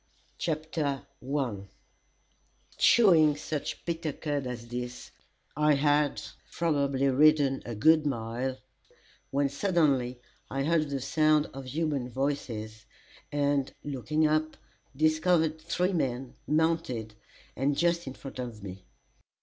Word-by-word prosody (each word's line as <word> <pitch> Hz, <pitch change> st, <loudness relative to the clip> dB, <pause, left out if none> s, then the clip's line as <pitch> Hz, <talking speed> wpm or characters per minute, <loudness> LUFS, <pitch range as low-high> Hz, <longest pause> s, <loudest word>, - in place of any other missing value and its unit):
CHAPTER 155 Hz, -3 st, -2 dB, 0.2 s
IV 125 Hz, -7 st, -2 dB, 1.1 s
Chewing 165 Hz, -10 st, +6 dB
such 150 Hz, 0 st, -4 dB
bitter 165 Hz, -2 st, -2 dB
cud 145 Hz, -2 st, -3 dB
as 120 Hz, -1 st, -6 dB
this, 125 Hz, 0 st, -6 dB, 0.4 s
I 150 Hz, 0 st, +4 dB
had 145 Hz, 0 st, +2 dB, 0.3 s
probably 140 Hz, -5 st, +1 dB
ridden 145 Hz, 0 st, +4 dB
a 120 Hz, -, -4 dB
good 155 Hz, +7 st, +4 dB
mile, 125 Hz, +1 st, -2 dB, 0.7 s
when 140 Hz, +1 st, +1 dB
suddenly 140 Hz, -6 st, +1 dB, 0.3 s
I 135 Hz, 0 st, -1 dB
heard 155 Hz, 0 st, +1 dB
the 140 Hz, -1 st, -2 dB
sound 155 Hz, +3 st, +2 dB
of 135 Hz, 0 st, -7 dB
human 140 Hz, -2 st, -2 dB
voices, 115 Hz, -5 st, -3 dB, 0.4 s
and 145 Hz, -2 st, +1 dB
looking 145 Hz, +3 st, 0 dB
up, 155 Hz, +1 st, +1 dB, 0.4 s
discovered 155 Hz, +1 st, +2 dB
three 180 Hz, +4 st, 0 dB
men, 130 Hz, -5 st, -2 dB
mounted, 150 Hz, -8 st, 0 dB, 0.4 s
and 140 Hz, +2 st, 0 dB
just 170 Hz, -1 st, +1 dB
in 130 Hz, -, -6 dB
front 135 Hz, -2 st, -9 dB
of 120 Hz, -5 st, -6 dB
me. 95 Hz, -1 st, -9 dB
145 Hz, 115 wpm, -29 LUFS, 130-155 Hz, 1.1 s, Chewing